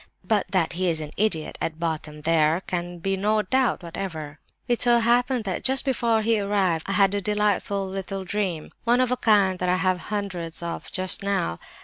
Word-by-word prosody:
(But 215 -4 +1
that 180 -4 +1
he 180 +1 0
is 160 -2 +1
an 150 -1 -6
'idiot,' 195 -7 0
at 160 -1 -3
bottom 155 -2 -3
there 160 +1 +2
can 175 0 -3
be 195 +3 -1
no 210 +2 +1
doubt 255 -1 +1
whatever.) 160 -4 -6 0.3
It 240 -1 +1
so 240 -1 +5
happened 240 +1 +2
that 195 -3 -3
just 265 +1 +2
before 230 -4 +1
he 225 0 +2
arrived 195 -5 +1
I - - 0
had 195 0 +4
a 205 - -1
delightful 205 -1 0
little 195 0 -4
dream; 185 -5 -2
one 240 +1 +3
of 255 -1 +2
a - - +3
kind 200 -5 +3
that 180 - 0
I 180 - +3
have 185 -1 +1
hundreds 180 -6 -3
of 170 - -5
just 185 -1 -2
now. 195 - -1
195 Hz, 200 wpm, -25 LUFS, 170-215 Hz, 0.3 s, so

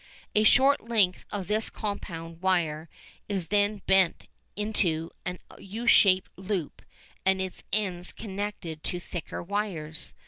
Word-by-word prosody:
A 215 - +4
short 270 +5 +6
length 215 -6 +2
of 200 -3 -3
this 215 +2 0
compound 165 -5 -5
wire 165 -4 +1 0.4
is 190 -5 -2
then 205 0 +2
bent 190 -3 +3 0.3
into 180 -6 0 0.2
a 180 0 -2 0.2
U 220 +5 -6
shaped 190 -5 +5
loop 190 -4 -3 0.4
and 190 0 +3
its 190 -1 -4
ends 185 -4 0
connected 200 -6 -5
to 180 - -1
thicker 175 -1 -6
wires. 175 -5 -3
190 Hz, 130 wpm, -28 LUFS, 175-210 Hz, 0.4 s, short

